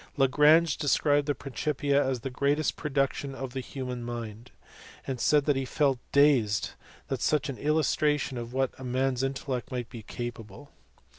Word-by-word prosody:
Lagrange 150 +4 +5
described 145 -1 +2
the 145 - +1
Principia 140 +2 0
as 130 -2 -2
the 135 - -5
greatest 145 +4 0
production 140 -1 -1
of 130 -2 -6
the 135 - -3
human 125 -2 -5
mind, 120 -1 -6 0.6
and 130 -2 -4
said 150 +3 +3
he 135 - -1
felt 135 -1 +1
dazed 135 -8 +3 0.4
at - - -2
such 150 -1 +1
an 135 - -5
illustration 150 -2 +1
of 120 -1 -5
what 130 0 -2
man 130 +1 0
s 125 - -3
intellect 135 -1 -3
might 125 -2 -4
be 115 - -8
capable. 120 +2 -8
135 Hz, 155 wpm, -28 LUFS, 125-145 Hz, 0.6 s, Lagrange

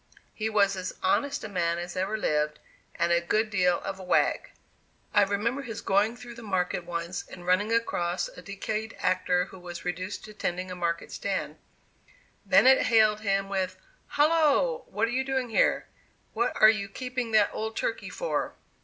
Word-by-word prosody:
He 220 0 -2
was 200 -2 +3
as 185 -1 -5
honest 280 +9 +1
a - - -4
man 170 -4 0
as 175 +1 -6
ever 190 +4 -1
lived, 150 -6 0 0.4
and 170 0 +1
a 170 0 +4
good 215 +5 0
deal 180 -3 +2
of 195 -1 -5
a - - -8
wag. 180 - +1 0.6
I 205 - +6
remember 205 +7 0
his 225 -5 -6
going 210 +4 +2
through 240 0 -10
the 235 - -11
market 180 -4 -1
once 170 +1 -4
and 175 - -11
running 185 +5 +2
across 230 - 0
a - - -12
decayed 215 +2 -4
actor 180 -1 +1
who 190 - -13
was 175 -1 -8
reduced 180 +2 -4
to 215 - -11
tending 185 -2 -3
a - - -4
market 170 -1 -2
stand; - - -3 0.9
Bennett 265 +1 +6
hailed 215 -2 +4
him 195 -2 0
with 190 -1 -2 0.3
"Hallo! 330 - +2
what 220 +2 0
are - - -4
you 260 +2 0
doing 265 -2 -1
here; - - +3 0.5
what 235 +2 -1
are 215 - +9
you 200 -2 -4
keeping 250 -1 -4
that 210 -2 +5
old 220 +1 -4
turkey 225 - -2
for?" - - -2
200 Hz, 180 wpm, -28 LUFS, 180-230 Hz, 0.9 s, are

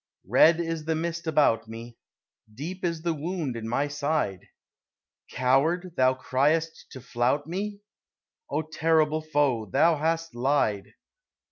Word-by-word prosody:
Red 165 +1 +5
is 165 -2 -3
the 160 0 0
mist 170 +1 -3
about 140 -8 +2
me; 115 +1 -9 0.6
Deep 165 - -7
is 165 -2 -2
the 170 -1 0
wound 160 -3 -3
in 115 -1 -5
my 140 +5 0
side; 145 - -2 0.8
"Coward" 155 +8 +1
thou 130 0 +3
criest 145 +6 0
to 130 - -8
flout 125 +5 0
me? 200 +5 -4 0.7
O 160 - -1
terrible 155 0 +1
Foe, 145 -8 0
thou 155 - +3
hast 165 +2 -1
lied! 120 -6 0
150 Hz, 130 wpm, -26 LUFS, 130-165 Hz, 0.8 s, Red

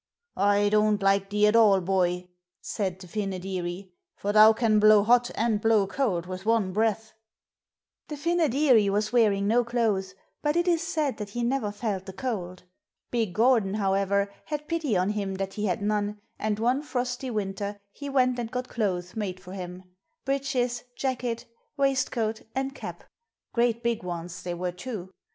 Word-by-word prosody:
'I 205 +1 +3
don't 210 -1 +2
like 195 0 +2
thee 210 +1 +3
at 210 +1 +4
all, 210 -4 +6
boy,' 180 -1 0 0.3
said 190 -4 -3
the 190 -1 -12
Fynoderee, 185 -1 -4 0.3
'for 205 +1 -2
thou 215 +1 +9
can 220 -1 +2
blow 215 -1 +7
hot 240 +2 +4
and 220 -2 +1
blow 220 -2 +4
cold 195 -5 -1
with 185 +1 -6
one 215 -4 +1
breath.' 220 +1 0 0.9
The 300 - -6
Fynoderee 290 - +3
was 210 +3 0
wearing 205 -4 +3
no 240 +3 +3
clothes, 215 -6 -1 0.3
but 295 +1 0
it 345 +1 +1
is 340 -2 +3
said 310 -4 -1
that 210 -2 -5
he 240 +4 -3
never 240 -3 0
felt 205 -3 -3
the 190 - -7
cold. 185 -6 -4 0.5
Big 225 -7 -1
Gordon, 225 -4 +3
however, 200 0 +1
had 300 0 -4
pity 315 - 0
on 185 +3 +1
him 200 -2 -3
that 195 0 -4
he 210 0 -2
had 185 +2 -1
none, 210 0 -1 0.2
and 215 -1 -1
one 245 +5 +1
frosty 250 -2 -3
winter 205 -2 -3
he 285 +5 -7
went 255 -2 +2
and 235 -2 -3
got 250 +1 -4
clothes 185 -5 -2
made 195 -4 -3
for 185 0 -11
him 180 -1 -7 0.4
breeches, 265 -3 -1
jacket, 245 -3 -2 0.3
waistcoat 250 -5 0
and 270 +1 -1
cap - - -8 0.5
great 235 -1 +1
big 235 -1 0
ones 175 -1 -6
they 175 -1 -4
were 180 +1 -2
too. 185 0 -7
215 Hz, 170 wpm, -27 LUFS, 195-245 Hz, 0.9 s, thou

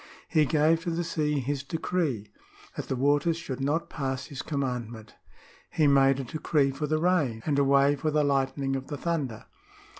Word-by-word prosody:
" - - -26
He 155 - +6
gave 155 +3 +3
to 175 - -3
the 170 +1 -1
sea 150 -3 -1
his 140 +2 -2
decree, 140 - -2 0.4
that - - -5
the 130 - -1
waters 145 +5 +2
should 135 -5 -6
not 145 +5 0
pass 130 -3 -3
his 140 - -6
commandment." 120 -6 -4
^ - - -20 0.3
" - - -27
He 155 - +4
made 135 -1 +4
a - - -2
decree 145 +1 0
for 150 +3 -3
the 155 +1 +1
rain, 155 -10 +1
and 145 -2 +1
a - - +4
way 140 +1 +4
for 155 +2 -1
the 150 0 +2
lightning 135 -1 0
of 135 0 -5
the 145 - -5
t'lunder." 140 -8 -3
140 Hz, 205 wpm, -27 LUFS, 135-155 Hz, 0.4 s, He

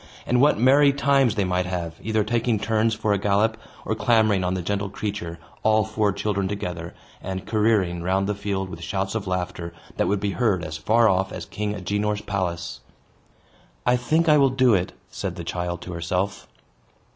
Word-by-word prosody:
And 125 0 +2
what 145 +2 +5
merry 140 +4 +6
times 140 -4 +2
they 100 - +1
might 90 -1 0
have, 85 -3 -3
either 110 -1 +1
taking 115 +1 +1
turns 110 +1 +1
for 105 -1 0
a 100 - 0
gallop, 105 +3 +2 0.3
or - - 0
clambering 110 -5 +3
on 90 +1 0
the 90 - -3
gentle 100 +2 -1
creature, 100 -4 -4 0.2
all 110 0 +3
four 110 -1 +1
children 100 -1 -1
together, 90 -4 -5 0.3
and 95 0 -5
careering 105 -6 +1
round 95 +3 +1
the 105 - 0
field 100 -1 -3
with 85 -2 -8
shouts 95 +2 -2
of 110 -3 -3
laughter 90 -2 -3 0.2
that - - +1
would 100 - +1
be 100 0 -1
heard 100 -5 +1
as 80 0 -5
far 110 +9 +3
off 95 -1 +1
as - - -6
King 105 0 -3
Agenor's 105 +2 -1
palace! 85 -9 -3 1.1
"I 125 - +4
think 155 +7 +1
I 150 -1 +6
will 135 -1 +5
do 130 -2 +3
it," 90 -2 0 0.2
said - - -4
the - - -6
child 85 -1 -3
to 90 - -7
herself. 90 +4 -2
100 Hz, 190 wpm, -24 LUFS, 90-110 Hz, 1.1 s, merry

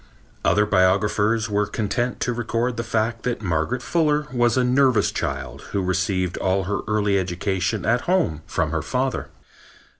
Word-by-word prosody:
Other 105 +3 +3
biographers 105 +3 +2
were 105 -1 0
content 120 +4 -2
to 125 - 0
record 120 +1 -1
the 115 - -3
fact 115 0 -1
that 120 -2 -3
Margaret 90 +8 -1
Fuller 150 -3 +1
was 120 -1 +2
a 130 - +3
nervous 130 -1 +3
child 70 -2 -4
who 100 - 0
received 90 -1 0
all 95 +1 +1
her 100 +3 -2
early 105 -2 +2
education 95 +3 -2
at 120 +2 +2
home 170 - +1
from - - -1
her - - -1
father. - - -2
105 Hz, 155 wpm, -23 LUFS, 95-120 Hz, -, Other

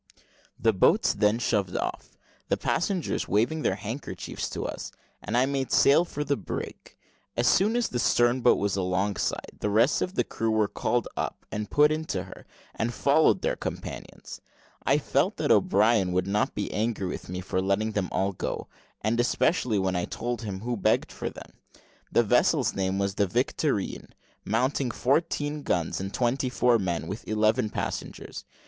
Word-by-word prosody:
The 115 - +3
boats 95 - +3
then 105 +1 +2
shoved 100 -6 0
off, - - -4 0.3
the - - +2
passengers 180 0 -1
waving 120 +10 +1
their 95 - +1
handkerchiefs 110 +7 -5
to - - -4
us, - - -5 0.3
and - - -2
I 125 - +4
made 135 -1 -2
sail 145 +5 +5
for 150 -3 -4
the 145 -1 0
brig. 100 - -7 0.4
As 120 - +2
soon 210 +5 +4
as 240 -1 +1
the 125 - -3
stern 120 +2 +3
boat 120 - +5
was 100 -1 0
alongside, 95 +1 -1
the 105 - -1
rest 115 +7 +3
of 185 - -2
the - - +2
crew 115 - -2
were 110 -1 +2
called 120 +2 -1
up - - -4
and 105 0 -4
put 150 +1 +4
into 155 +1 -2
her, - - -13 0.3
and 115 +1 -1
followed 140 +6 +3
their - - +1
companions. - - -7 0.4
I - - +3
felt - - 0
that - - +1
O'Brien 100 -2 +3
would 90 - +1
not 105 +2 0
be 100 - -3
angry 110 -2 -1
with 90 - -5
me 90 0 -4
for 95 0 -2
letting 100 +3 0
them 100 -3 -1
all 95 +1 0
go; 90 - -4 0.3
and 110 +3 0
especially 120 - +2
when 95 -1 0
I 90 -1 0
told 120 -1 -4
him 100 -4 -5
who 120 +1 -2
begged 100 - +1
for - - -4
them. - - -12 0.6
The - - +4
vessel's - - +3
name 95 0 -1
was 100 0 0
the 100 +1 +1
Victorine, 90 - -1 0.3
mounting 125 +4 0
fourteen 145 +3 0
guns, 85 - -1
and 95 0 -4
twenty 125 +3 0
four 125 -1 +3
men, 90 -4 -2
with 100 +7 -7
eleven 110 +2 +2
passengers. - - -5
110 Hz, 175 wpm, -27 LUFS, 100-130 Hz, 0.6 s, sail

